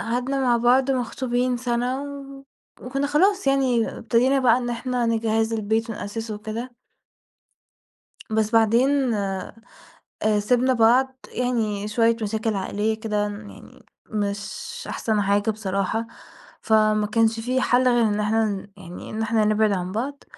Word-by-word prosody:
قعدنا 250 +4 -1
مع 245 -2 +3
بعض 255 +3 +3
مخطوبين 250 0 -1
سنة 245 +2 -1
و 275 -1 -9 0.4
وكنا 275 +3 -2
خلاص 385 +5 +2
يعني 260 -4 +2
ابتدينا 245 +5 +2
بقى 245 -2 +4
إن 240 -1 -3
إحنا 245 0 -2
نجهِّز 225 0 0
البيت 220 +1 -1
ونأسسه 220 +1 -5
وكده. 220 +4 -6 1.6
بس 220 0 0
بعدين 240 +3 +3
آآ 195 -2 -3 0.9
سِبنا 250 +4 +2
بعض، 255 +3 +3
يعني 220 -5 -1
شوية 230 +1 +2
مشاكل 220 +1 -1
عائلية 210 +3 -2
كده 210 -2 -1
ن 205 0 -8
يعني - - -16 0.3
مش 210 - -4
أحسن 215 -2 -1
حاجة 200 +2 +1
بصراحة، 210 +1 -2 0.5
فما 215 -1 +3
كانش 225 +1 +1
في 255 +3 0
حل 255 0 +3
غير 240 -1 +3
إن 210 -1 0
إحنا 220 +1 +1
ن 200 -1 -4
يعني 180 -2 -10
إن 220 +1 -3
إحنا 220 -1 +1
نبعد 215 0 +2
عن 185 -1 -2
بعض، 275 +6 -4
225 Hz, 140 wpm, -23 LUFS, 215-250 Hz, 1.6 s, بقى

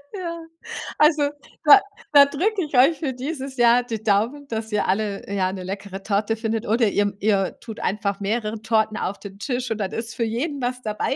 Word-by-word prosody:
Ja. 340 -3 -4 0.6
Also, 300 -2 +4 0.3
da 355 +7 +9 0.3
da 285 -1 +9
drücke 380 +8 0
ich 295 -3 -3
euch 275 +4 +5
für 280 -4 -2
dieses 270 0 -5
Jahr 240 0 +5
die 225 -3 -5
Daumen, 225 +7 +1
dass 220 -1 -4
ihr 210 - +1
alle, 200 +1 -1
ja, 185 -2 +1
'ne 190 -1 -6
leckere 195 0 -6
Torte 210 +2 0
findet 225 0 -2
oder 225 +1 +3
ihr 205 0 +1
ihr 200 -2 +1
tut 220 -2 -9
einfach 200 0 -1
mehrere 215 +1 -2
Torten 220 -1 +1
auf 200 - -3
den 200 -1 -10
Tisch 250 +1 -3
und 220 - -1
dann 195 -2 -3
ist 230 -1 -4
für 235 - -1
jeden 270 +6 -2
was 250 +1 -2
dabei. 215 +4 -1
225 Hz, 200 wpm, -23 LUFS, 205-270 Hz, 0.6 s, da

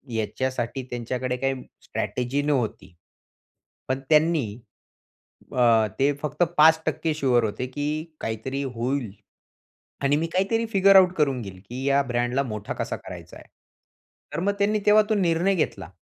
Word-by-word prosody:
याच्यासाठी 130 +3 -2
त्यांच्याकडे 125 +1 -3
काही 135 0 -2 0.2
स्ट्रॅटेजी 125 +3 -2
नव्हती. 125 -10 -1 0.9
पण 130 +1 -1
त्यांनी 155 -3 +4 1.1
अ, 115 -3 +4
ते 140 +2 +4
फक्त 150 +3 0
5% 160 0 +4
शुअर 125 -5 +2
होते 110 +4 -2
की 145 +3 -4 0.3
काहीतरी 130 +5 -3
होईल 120 -2 -2 0.9
आणि 140 +1 +3
मी 165 +1 -1
काहीतरी 225 +5 +1
फिगर 195 0 +6
आउट 185 -1 +7
करून 135 -5 +1
घेईल 95 -3 -9
की 130 +2 -5
या 140 0 +4
ब्रँडला 125 +1 0
मोठा 105 -5 -5
कसा - - -3
करायचा - - -10
आहे. - - -16 0.9
तर - - -2
मग 200 +2 +1
त्यांनी 210 +1 +2
तेव्हा 215 +1 +7
तो 215 - +2
निर्णय 180 +1 +2
घेतला 155 - -2
135 Hz, 140 wpm, -25 LUFS, 120-160 Hz, 1.1 s, आउट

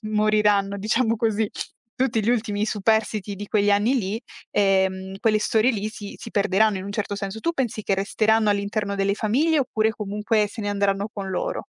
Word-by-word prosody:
moriranno, 210 -2 +2
diciamo 225 +3 +1
così, 220 -2 0 0.5
tutti 230 -4 +1
gli 220 - +2
ultimi 215 -3 0
superstiti 215 -1 0
di 205 +1 -6
quegli 205 -1 +2
anni 205 +6 +3
lì, 205 +1 -2 0.3
ehm, 190 -1 +1
quelle 215 -1 +3
storie 220 +3 +2
lì 215 -2 -2
si 205 -2 -9
si 230 - -9
perderanno 200 0 +2
in 185 - -6
un 200 - -5
certo 205 -1 -2
senso. 200 +2 -5
Tu 335 - 0
pensi 245 -8 -2
che 195 - +1
resteranno 215 +2 +2
all'interno 200 0 -1
delle 195 0 +1
famiglie 270 +10 +1
oppure 220 -4 +1
comunque 210 0 0
se 220 +1 -7
ne 205 - -1
andranno 200 0 0
con 200 -3 -5
loro? 185 - -3
210 Hz, 185 wpm, -23 LUFS, 200-220 Hz, 0.5 s, anni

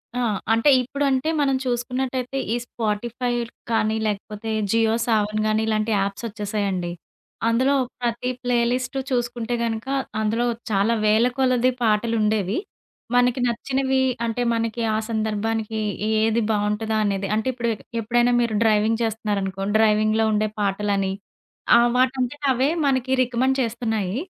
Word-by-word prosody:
ఆ! 250 - 0 0.3
అంటే 230 +6 +3
ఇప్పుడంటే 275 +2 0
మనం 275 -2 +2
చూసుకున్నట్టయితే 250 +1 -2 0.2
ఈ - - +1
స్పాటిఫై 235 +2 -2 0.4
కానీ 220 -1 +1
లేకపోతే 210 +1 -4 0.2
జియో 225 -1 +3
సావన్ 215 -2 +1
గానీ 215 0 +1
ఇలాంటి 215 0 0
యాప్స్ 200 +3 -2
వచ్చేసాయండి. 200 -4 -2 0.6
అందులో 260 +5 +3 0.3
ప్రతి 240 +1 -1
ప్లే 245 -1 +1
లిస్ట్ 255 +1 -2
చూసుకుంటే 240 -1 -1
గనుక 225 +2 -3 0.3
అందులో 225 +3 0 0.3
చాలా 205 +3 +2
వేలకొలది 250 +3 +3
పాటలుండేవి. 215 -2 +1 0.6
మనకి 245 +1 +3
నచ్చినవి 265 +3 0 0.3
అంటే 230 +2 -2
మనకి 230 0 -2
ఆ - - +1
సందర్భానికి 220 0 -1 0.4
ఏది 225 +1 +2
బావుంటదా 210 +1 0
అనేది 195 -1 -1
అంటే 220 +4 -1
ఇప్పుడు 235 -1 -2 0.3
ఎప్పుడైనా 240 +2 +2
మీరు 235 -2 0
డ్రైవింగ్ 220 +1 +2
చేస్తున్నారనుకో 205 -3 -2 0.2
డ్రైవింగ్‌లో 215 0 +3
ఉండే 215 0 +1
పాటలని 200 -1 0 0.7
ఆహ్, 240 0 +4
వాటంతట 260 +2 0
అవే 260 +3 +1 0.2
మనకి 260 -1 0
రికమెండ్ 255 +2 +1
చేస్తున్నాయి. 225 -2 -2
225 Hz, 120 wpm, -23 LUFS, 215-245 Hz, 0.7 s, ఆహ్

